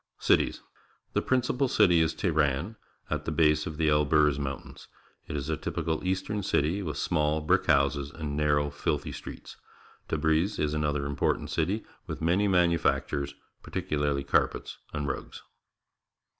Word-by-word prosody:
Cities. - - +2 0.2
— - - -38
The - - +2
principal 130 +1 +1
city 95 -8 +4
is 80 0 +1
Teheran, 80 +4 0 0.4
at - - -2
the - - -2
base 75 -1 +3
of 80 - -6
the 80 -1 +2
Elburz 75 -1 +3
Mountains. 70 -2 -6 0.4
It - - -5
is 70 0 -4
a 80 - 0
typical 80 0 -3
eastern 95 +3 -1
city, 85 +2 +1
with 75 -7 -4
small, 75 0 +1
brick 75 - +1
houses 70 0 +2
and 75 -2 -5
narrow, 75 -1 +2
filthy - - -2
streets. - - -9 0.5
Tabriz 80 +6 +1
is 75 0 0
another 75 -2 0
important 70 0 -1
city, 95 +7 -1 0.2
with - - -5
many 90 +6 +2
manu 90 -3 +3
factures, 70 -2 -1 0.3
particularly 75 -2 -1
carpets 70 - 0
and 75 -2 -3
rugs. 70 - -5
75 Hz, 150 wpm, -28 LUFS, 75-85 Hz, 0.5 s, city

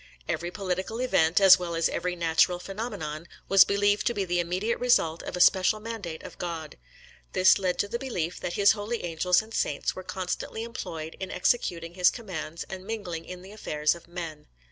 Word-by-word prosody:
Every 175 - -2
political 190 +3 -3
event, 170 -10 +3
as 190 -1 +8
well 170 -2 -4
as 165 - +2
every 180 0 -2
natural 170 +1 +2
phenomenon, 180 -6 -5 0.2
was 195 -1 +8
believed 205 +1 +1
to 240 - 0
be 200 - -1
the 175 -1 0
immediate 185 +7 -1
result 170 -10 +2
of - - -5
a - - -4
special 190 +3 +5
mandate 210 -7 -6
of - - -11
God. 165 -3 -5 0.6
This 185 +2 +5
led 185 -2 0
to 205 - 0
the 235 +3 -3
belief 180 -11 -3
that 175 - -4
His 200 +2 +5
holy 220 +2 -3
angels 175 +4 +2
and 220 +1 -14
saints 145 - -1
were 185 - -6
constantly 185 +4 -4
employed 165 -9 -6
in 190 - -5
executing 175 -4 0
His 180 0 +5
commands 165 -8 -6
and 190 -1 -8
mingling 190 -6 -5
in 180 0 -9
the 190 - -12
affairs 150 -8 0
of 170 -1 -13
men. 165 -4 -7
180 Hz, 190 wpm, -27 LUFS, 170-205 Hz, 0.6 s, as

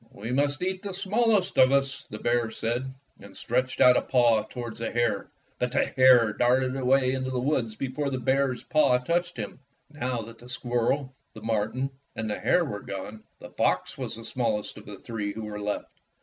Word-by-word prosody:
"We 110 +4 -6
must 145 +4 +1
eat 185 0 -2
the 200 -3 -5
smallest 205 0 +1
of 130 +1 +7
us," 140 -1 0
the 105 - -6
bear 120 0 +1
said, 120 +4 -2 0.3
and 100 -1 -13
stretched 125 +2 -1
out 125 0 +7
a - - +3
paw 120 -4 +3
toward 120 0 -6
the 115 - -2
hare. 120 0 0 0.3
But 125 0 -1
the 140 - +3
hare 125 -4 +6
darted 130 +3 +2
away 130 0 +3
into 130 0 -2
the 130 -1 -1
woods 125 -5 0
before 135 +4 -2
the 130 - -2
bear's 130 +1 +1
paw 145 -5 +3
touched 175 +7 -1
him.' - - -5 0.3
Now 125 -5 -3
that 115 +1 -12
the 120 - -13
squirrel, 130 +2 -1 0.2
the 110 - -10
marten, 115 +5 -1 0.2
and 110 - -3
the 105 - -3
hare 175 -1 +3
were 105 -8 -4
gone, 105 +3 -7
the - - -11
fox - - 0
was - - -5
the 115 0 -10
smallest 110 -4 -2
of - - -12
the 105 -1 -8
three 105 -1 -4
who 110 - -6
were 105 -1 -6
left. 105 0 -4
125 Hz, 200 wpm, -27 LUFS, 115-135 Hz, 0.3 s, of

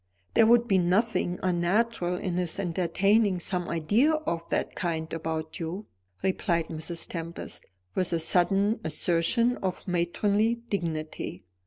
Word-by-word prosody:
"There 225 - +6
would 240 +1 +5
be 195 -3 +4
nothing 180 0 +1
unnatural 180 +1 +1
in 180 -1 -2
his 180 -3 -1
entertaining 195 +2 +2
some 180 0 -2
idea 210 - +2
of 170 - -2
that - - -1
kind 160 -2 -3
about 160 0 -4
you," 175 +5 -4 0.4
replied 170 -3 0
Mrs. 165 +1 -4
Tempest, 170 0 -6 0.3
with 185 -2 0
a 170 - +2
sudden 195 +6 +2
assertion 175 +9 +1
of 185 0 -4
matronly 200 +6 +1
dignity. 165 - -4
180 Hz, 130 wpm, -28 LUFS, 170-205 Hz, 0.4 s, There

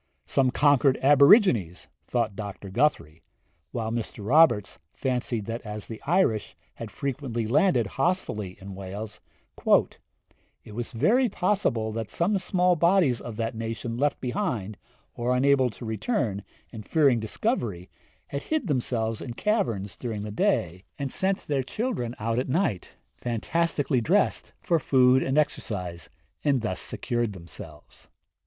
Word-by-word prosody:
'Some 130 -1 +2
conquered 140 0 +4
aborigines,' 140 - +5 0.2
thought 115 -5 -1
Dr. 100 -2 -7
Guthrie; 85 - 0 0.5
while 110 -1 -3
Mr. 115 -2 -4
Roberts 125 -9 +4 0.2
fancied 125 -4 -2
that 115 +2 -4
as 105 -1 -6
the 110 - -8
Irish 155 - +1 0.2
had - - -8
frequently 135 -4 -3
landed 125 - +3
hostilely 110 - -2
in 95 0 -9
Wales, 100 +3 -7 1.4
'it - - -12
was 120 +2 -4
very 225 - +3
possible 180 - 0
that 110 -1 -4
some 190 +4 +1
small 180 -1 +2
bodies 170 - +3
of 115 -3 -7
that 115 -1 -2
nation 115 +1 -4
left 145 +4 0
behind, 120 - -2 0.4
or 125 +1 0
unable 135 0 +3
to 115 +2 -10
return, 110 - -1 0.3
and 110 -2 -9
fearing 140 -7 +3
discovery, 110 - -2 0.4
had 140 - -3
hid 310 - -1
themselves 120 - -1
in 120 -3 -6
caverns 115 - -1
during 110 -4 -5
the 105 - -5
day, 90 -3 0
and 140 -2 -3
sent 190 0 -1
their 140 -2 0
children 130 - -3
out 115 +2 -1
at 130 - -3
night, 130 - -1 0.2
fantastically 140 +3 0
dressed, 190 - +1
for 170 -3 +2
food 130 -2 +4
and 135 +3 0
exercise, 90 - -2 0.3
and 140 -4 +2
thus 95 -4 -2
secured 120 -3 -2
themselves.' 85 -4 -11
120 Hz, 135 wpm, -26 LUFS, 110-150 Hz, 1.4 s, aborigines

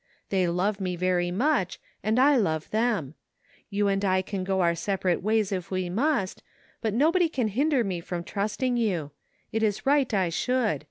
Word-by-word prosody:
They 190 -2 +2
love 195 +4 0
me 180 -1 -1
very 175 0 +1
much 210 - 0 0.2
and 215 +3 0
I 280 +3 +5
love 160 - 0
them. 215 - 0 0.6
You 205 0 +1
and 195 0 0
I 185 -1 +2
can 190 0 -4
go 190 0 0
our 170 -1 +3
separate 185 0 -1
ways 215 0 +1
if 185 -3 -3
we 185 -2 -2
must, 230 - 0 0.4
but 220 -3 -1
nobody 330 +6 +3
can 250 -8 -1
hinder 270 +4 +2
me 190 -4 -2
from 170 0 -5
trusting 215 +7 -1
you. 180 -11 -1 0.4
It 220 - -1
is 210 -2 0
right 275 -1 +3
I 190 -5 +1
should. 230 - 0
200 Hz, 180 wpm, -27 LUFS, 180-240 Hz, 0.6 s, I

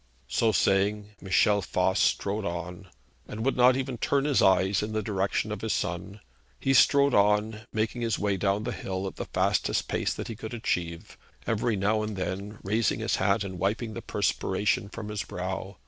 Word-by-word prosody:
So 110 - +2
saying, 105 +1 +1
Michel 100 +2 +3
Voss 95 +1 0
strode 100 +3 +1
on, 90 +1 -5 0.4
and 110 +2 -5
would 135 - +2
not 125 +1 +5
even 130 -3 -3
turn 140 0 +1
his 145 -3 +3
eyes 95 +1 +3
in 105 +1 -4
the 110 0 -1
direction 100 +1 -1
of 105 - -4
his 110 - -1
son. 90 +4 -3 0.4
He 135 - +1
strode 140 0 +5
on, 105 +2 +2
making 110 +2 -1
his 115 -3 0
way 100 -1 0
down 100 +2 0
the 120 - -2
hill 95 -3 -4
at 95 - -6
the - - -4
fastest - - 0
pace - - -1
that - - -5
he 115 - -5
could 110 +2 -7
achieve, 85 -7 -3 0.3
every 115 +1 0
now 105 +2 +1
and 105 -1 -3
then 100 +3 -4
raising 110 +4 +1
his - - 0
hat 100 +2 +2
and 95 -2 -6
wiping 110 +4 -1
the - - -6
perspiration 100 +1 0
from 105 0 -7
his 105 -2 -3
brow. - - -5
105 Hz, 190 wpm, -27 LUFS, 95-110 Hz, 0.4 s, not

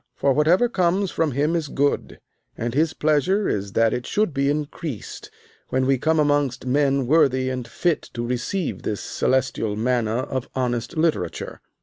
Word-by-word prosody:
For 140 - +2
whatever 165 - +4
comes 185 -2 +1
from 160 -4 0
him 150 +5 +1
is 165 -3 -1
good, 145 +1 -1 0.4
and 115 +1 -3
his 155 +4 +2
pleasure 155 +7 +2
is 100 -1 -2
that 115 0 +3
it 125 - -3
should 210 -6 0
be 140 0 +1
increased 150 - -4 0.4
when 130 0 +1
we 135 -1 +2
come 160 +4 +2
amongst 145 -4 +1
men 135 0 +2
worthy 130 -3 +3
and 125 -2 -4
fit 170 +6 -1
to 120 0 -2
receive 125 +9 -2
this 105 - -3
celestial 130 -5 0
manna 115 0 0
of 130 -2 -4
honest 120 +3 -2
literature. 155 - -1
140 Hz, 160 wpm, -23 LUFS, 125-155 Hz, 0.4 s, whatever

